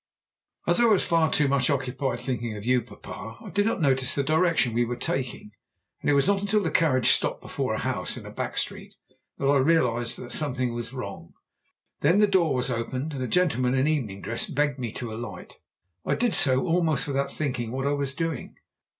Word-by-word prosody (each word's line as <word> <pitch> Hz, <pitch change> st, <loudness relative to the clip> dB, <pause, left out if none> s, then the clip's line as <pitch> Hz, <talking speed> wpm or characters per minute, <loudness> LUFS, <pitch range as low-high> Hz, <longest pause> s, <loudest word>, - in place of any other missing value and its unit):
"As -, -, +3 dB
I 240 Hz, -, +5 dB
was 215 Hz, -5 st, +4 dB
far 165 Hz, -2 st, +2 dB
too 150 Hz, -, +3 dB
much 140 Hz, +1 st, +2 dB
occupied 135 Hz, -2 st, -1 dB
thinking 120 Hz, -4 st, -3 dB
of 105 Hz, -, -8 dB
you, 125 Hz, 0 st, +3 dB
papa, 110 Hz, 0 st, -10 dB
I -, -, -10 dB
did 205 Hz, +1 st, +2 dB
not 225 Hz, -, -1 dB
notice 135 Hz, -3 st, +2 dB
the 140 Hz, -, +1 dB
direction 155 Hz, -4 st, +2 dB
we 120 Hz, +1 st, +2 dB
were 120 Hz, +1 st, -2 dB
taking, 125 Hz, -3 st, -3 dB, 0.5 s
and -, -, 0 dB
it -, -, +5 dB
was 140 Hz, -, +3 dB
not 200 Hz, -1 st, +2 dB
until 205 Hz, +1 st, +1 dB
the 165 Hz, -, -1 dB
carriage 130 Hz, -8 st, +3 dB
stopped -, -, +1 dB
before -, -, -3 dB
a -, -, -2 dB
house -, -, -2 dB
in -, -, -9 dB
a -, -, -8 dB
back -, -, -4 dB
street -, -, -3 dB, 0.4 s
that -, -, -3 dB
I 140 Hz, +1 st, +4 dB
realized 125 Hz, -5 st, +2 dB
that 120 Hz, -, -8 dB
something 130 Hz, -5 st, +1 dB
was 120 Hz, 0 st, -5 dB
wrong. 130 Hz, -7 st, -7 dB, 0.7 s
Then 165 Hz, +7 st, +3 dB
the 210 Hz, -, +6 dB
door 175 Hz, -8 st, +2 dB
was 125 Hz, +1 st, 0 dB
opened, 130 Hz, +5 st, -3 dB
and 135 Hz, -, -4 dB
a 125 Hz, -, -1 dB
gentleman 130 Hz, -8 st, +2 dB
in 135 Hz, +2 st, +2 dB
evening 115 Hz, -11 st, -1 dB
dress 115 Hz, +1 st, -2 dB
begged 145 Hz, -1 st, 0 dB
me 120 Hz, -3 st, -3 dB
to 115 Hz, -3 st, -5 dB
alight. 120 Hz, +3 st, -8 dB, 0.5 s
I -, -, 0 dB
did 240 Hz, -4 st, +1 dB
so, 130 Hz, -4 st, +3 dB
almost 165 Hz, -5 st, +2 dB
without 140 Hz, -1 st, -1 dB
thinking 125 Hz, -6 st, -2 dB
what 135 Hz, +2 st, -3 dB
I 140 Hz, -, +2 dB
was 140 Hz, -1 st, -1 dB
doing. 165 Hz, -5 st, -3 dB
135 Hz, 210 wpm, -26 LUFS, 125-160 Hz, 0.7 s, the